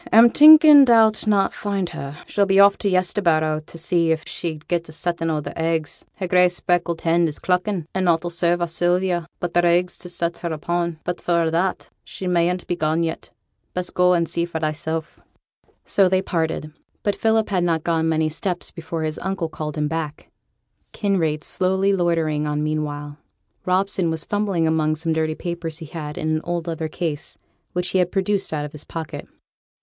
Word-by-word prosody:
'A'm 230 +1 +7
thinking 305 -1 +9
thou'll 225 -3 +6 0.2
not 200 -2 +2
find 200 -3 -2
her. 140 +1 -7
She'll 200 -1 +1
be 195 0 +3
off 200 0 +7
to 200 - 0
Yesterbarrow 170 -4 +1
t' 165 - -12
see 170 0 +1
if 160 -1 -1
she'd 160 -3 -5
get 170 -2 -2
a - - -8
settin' 165 +1 -2
o' 155 -1 -1
their - - -7
eggs; 160 -2 -2
her 185 - -4
grey 180 0 +4
speckled 175 -1 -1
hen 170 0 +2
is 150 - -5
cluckin', 180 -1 -1
and 190 -1 0
nought 170 -1 +2
'll 175 - -3
serve 175 0 0
our 175 - +1
Sylvia 175 0 0
but 175 -1 -4
their 175 0 +3
eggs 175 +1 +1
to 180 - -8
set 170 -1 -2
her 170 - -4
upon. 170 +1 -2
But, 180 - -4
for 170 -1 +1
a' 160 - 0
that, 180 +3 -1
she 190 - -8
mayn't 180 0 +1
be 175 - -2
gone 160 0 0
yet. 165 0 -4 0.5
Best 180 0 -4
go 180 0 +4
on - - +3
and 170 -1 0
see 170 - -1
for 170 -2 -5
thysel'.' 160 +1 -2 0.8
So 195 -2 +3
they 185 0 +1
parted; 160 -3 -2 0.3
but 205 - 0
Philip 220 -1 +1
had 185 -3 +1
not 165 -2 0
gone 165 -1 +1
many 160 -1 +1
steps 175 +3 -4
before 165 -1 -5
his 155 -1 -3
uncle 190 -3 -2
called 155 -1 -6
him 150 0 0
back, 155 -1 -5 0.6
Kinraid 165 -7 0
slowly 190 +1 +1
loitering 165 -4 0
on 150 0 -1
meanwhile. 150 -1 -3 0.5
Robson 185 -1 +1
was 160 -1 -2
fumbling 200 -5 0
among 155 -1 +1
some 160 +1 -2
dirty 160 0 -1
papers 170 -2 -4
he 165 - -8
had 150 -1 -7
in 155 - -2
an - - -5
old 175 -1 -3
leather 165 -2 -3
case, 160 -1 -4 0.4
which 180 0 -1
he 190 - +1
had 180 -1 +1
produced 195 0 0
out 150 -2 -2
of 150 - -8
his 150 0 -8
pocket. 160 -2 -7
170 Hz, 200 wpm, -22 LUFS, 160-185 Hz, 0.8 s, thinking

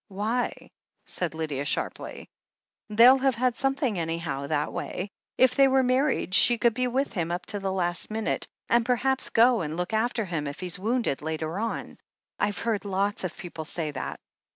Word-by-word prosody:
"Why 220 +4 -2 0.2
?" - - -66
said 175 -3 -1
Lydia 150 -4 -2
sharply. 145 - -3 0.6
"They'll 240 +5 +7
have 265 -1 +2
had 250 0 +1
something, 270 - 0
anyhow, 165 -4 -3
that 150 -1 -1
way. 195 +2 -4 0.3
If 255 -1 +5
they 275 0 +5
were 265 0 +3
married, 255 -5 +1
she 240 +4 +6
could 235 -1 +3
be 250 +2 0
with 265 +2 -1
him 170 -5 -1
up 175 +1 -3
to 205 - -2
the 195 -1 -2
last 175 -2 -2
minute, 220 0 -1 0.2
and 235 0 +3
perhaps 255 +2 +1
go 235 0 +4
and 155 0 -4
look 180 +4 -3
after 225 0 0
him 165 -5 -3
if 140 - -6
he's 180 -2 -4
wotmded 225 - 0
later 160 +3 -3
on. 230 +1 -4 0.4
I've 205 0 0
heard 225 -3 -1
lots 200 0 -1
of 180 -2 -4
people 165 -3 -7
say 155 0 -4
that. 130 - -5
205 Hz, 185 wpm, -27 LUFS, 170-245 Hz, 0.6 s, They'll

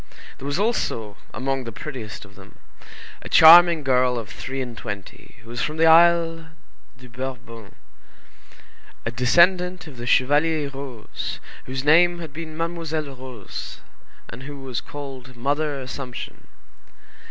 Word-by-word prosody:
There 135 - -6
was 145 +2 -1
also, 115 - -1 0.2
among 135 +3 -2
the 115 - -6
prettiest 120 -4 -8
of - - -18
them, - - -16 0.6
a - - -9
charming 170 0 +8
girl 125 -2 +2
of 115 -3 -6
three 135 +1 -6
and 125 -3 -5
twenty, 100 -1 -8
who 115 - -15
was 120 - -4
from 155 +1 -2
the 165 - +4
Isle 165 0 +5 0.5
de 125 0 -14
Bourbon, 120 -3 -8 1.3
a 115 - -1
descendant 175 +8 +3
of 145 -5 -12
the 120 0 -6
Chevalier 145 +4 +2
Roze, 135 -5 -7 0.3
whose 130 0 -4
name 175 +4 +5
had 160 -4 -8
been 155 -1 -7
Mademoiselle 160 -4 -3
Roze, 125 -5 -8 0.5
and 120 - -10
who 140 +1 -8
was 130 -3 -4
called 135 -3 -9
Mother 145 +3 -1
Assumption. 130 -1 -7
135 Hz, 140 wpm, -23 LUFS, 125-160 Hz, 1.3 s, charming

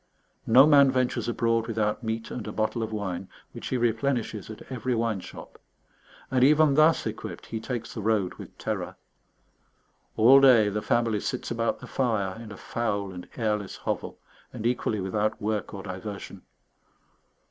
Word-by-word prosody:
No 125 +5 +8
man 140 -2 +6
ventures 130 -1 0
abroad 115 -1 +1
without 110 -1 -1
meat 110 0 -3
and 115 -3 -5
a - - -4
bottle 110 +2 -1
of 110 -1 -3
wine, 95 -3 -4 0.2
which - - -7
he 130 - -1
replenishes 120 -2 -1
at 110 - -9
every 125 0 -1
wine 115 -3 0
shop; - - -11 0.7
and 130 -1 +3
even 150 +1 +5
thus 155 +3 +4
equipped - - -6
he 110 - -5
takes 115 0 -5
the 110 - -5
road 105 -3 +1
with - - -11
terror. - - -4 1.2
All 130 +5 +7
day 120 -6 +6
the 105 +1 -2
family 115 -2 +1
sits 125 +4 -4
about 115 0 -1
the - - -8
fire 110 -7 -1
in 110 -2 -9
a 100 - -9
foul 100 -4 -2
and 90 -1 -9
airless 105 -4 -1
hovel, - - -4 0.3
and 115 -3 -7
equally 120 -3 0
without 105 +3 -1
work 105 0 -2
or 100 -1 -7
diversion. 100 +1 -7
115 Hz, 165 wpm, -27 LUFS, 105-125 Hz, 1.2 s, No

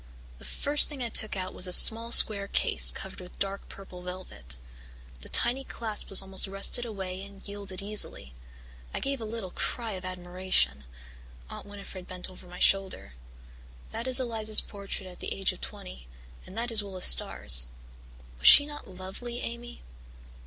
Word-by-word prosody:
The - - -12
first 290 +1 0
thing 280 -4 -7
I 235 - -4
took 215 -2 +2
out 185 0 -6
was 180 - +2
a - - -6
small 230 +5 +6
square 200 -4 +6
case - - +4
covered - - -4
with 180 - -14
dark 195 0 -6
purple 190 -2 -13
velvet. 180 - -8 0.6
The - - -13
tiny 250 +3 +2
clasp 220 -5 -5
was 195 0 +5
almost 190 +1 +2
rusted 195 +5 +2
away 190 -4 -7
and 200 0 -13
yielded 200 -2 -7
easily. 200 - -1 0.6
I - - -3
gave 275 -2 -4
a - - -6
little 215 -4 -8
cry 230 +3 -5
of 185 -2 -7
admiration. 180 - 0 0.7
Aunt - - -10
Winnifred 200 -2 -11
bent 185 0 -7
over 180 0 -15
my 180 0 -12
shoulder. 190 - 0 0.8
"That 230 +3 -6
is 260 0 +3
Eliza's 220 -4 0
portrait 200 -1 -5
at 180 -1 -13
the - - -5
age 195 - -2
of - - -16
twenty, - - -9 0.4
and 190 - -13
that 235 +1 -3
is 220 -2 -1
Willis 190 -2 -2
Starr's. 60 0 +4 0.7
Was - - +4
she 285 - +10
not 295 0 -10
lovely, 190 +7 -8
Amy?" 235 +1 -8
195 Hz, 170 wpm, -27 LUFS, 185-225 Hz, 0.8 s, she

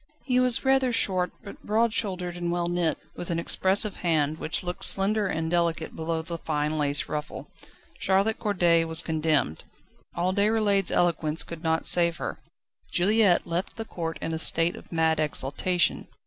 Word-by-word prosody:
He 250 -2 +2
was 250 0 +3
rather 265 -1 +3
short, 185 -6 +1
but 200 - -11
broad 220 +2 +1
shouldered 180 -5 -2
and 175 -1 -3
well 175 0 -1
knit, 175 -2 0 0.2
with 175 - -7
an 170 - -1
expressive 190 +4 +1
hand, 155 -2 0
which 155 - -3
looked 180 0 -5
slender 205 +1 +2
and 160 -2 -2
delicate 170 -2 -1
below 160 0 -3
the 170 +1 -6
fine 150 -1 -2
lace 145 0 0
ruffle. 150 0 -6 0.5
Charlotte 195 +3 +1
Corday 175 -6 +2
was 165 +1 -1
condemned. 155 - 0 0.5
All 180 +2 0
Déroulède's 205 -1 +2
eloquence 165 -3 +1
could 170 -1 -9
not 160 -1 0
save 170 -2 +4
her. - - -5 0.5
Juliette 200 0 +3
left 170 +2 -3
the 225 - -5
court 165 -5 -5
in 165 - -3
a 160 - -2
state 165 +1 +2
of - - -14
mad 160 -1 +1
exultation. 155 +4 0
175 Hz, 165 wpm, -26 LUFS, 160-195 Hz, 0.5 s, save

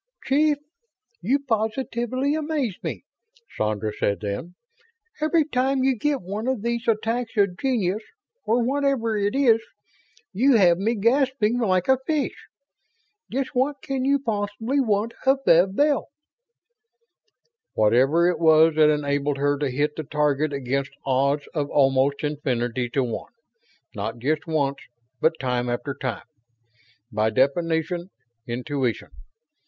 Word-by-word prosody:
"Chief, 295 +2 +3 0.6
you 240 +10 +2
positively 255 +2 -1
amaze 300 -7 -1
me," - - -5 0.5
Sandra 105 0 -1
said 100 -1 0
then. 105 - -5 0.7
"Every 310 0 +2
time 265 -1 0
you 265 -1 +3
get 280 0 -1
one 205 +6 -4
of 260 -5 -1
these 235 0 -2
attacks 230 +1 -1
of 200 -3 +2
genius 215 -6 0 0.4
or 235 +2 +1
whatever 270 -3 0
it 205 +1 0
is 245 -5 +4 0.7
you 255 +7 +4
have 180 -5 +5
me 225 +4 0
gasping 245 +1 +2
like 185 -6 +1
a 265 -1 +4
fish. 305 -3 0 1.0
Just 265 +2 -2
what 270 +3 +1
can 270 -1 -2
you 280 +1 +3
possibly 225 +1 -2
want 220 -2 0
of 270 0 +3
Bev 180 +4 +4
Bell?" 290 +2 +2 1.7
"Whatever 130 +10 +4
it 180 - 0
was 160 0 +5
that 155 -1 +6
enabled 145 -1 0
her 145 +1 +1
to 145 -2 0
hit 145 +4 -1
the 155 - -4
target 150 0 0
against 140 0 -3
odds 140 +2 +1
of 145 -4 -2
almost 135 0 +2
infinity 125 -5 -2
to 135 +2 0
one; 120 - -5 0.6
not 110 +3 -4
just 150 +7 -1
once, 140 -4 0 0.4
but 160 0 +1
time 125 -2 -1
after 140 +4 -3
time. 130 -3 -4 0.9
By 110 0 +1
definition, 160 - 0 0.4
intuition. 125 +1 -2
185 Hz, 130 wpm, -24 LUFS, -, 1.7 s, that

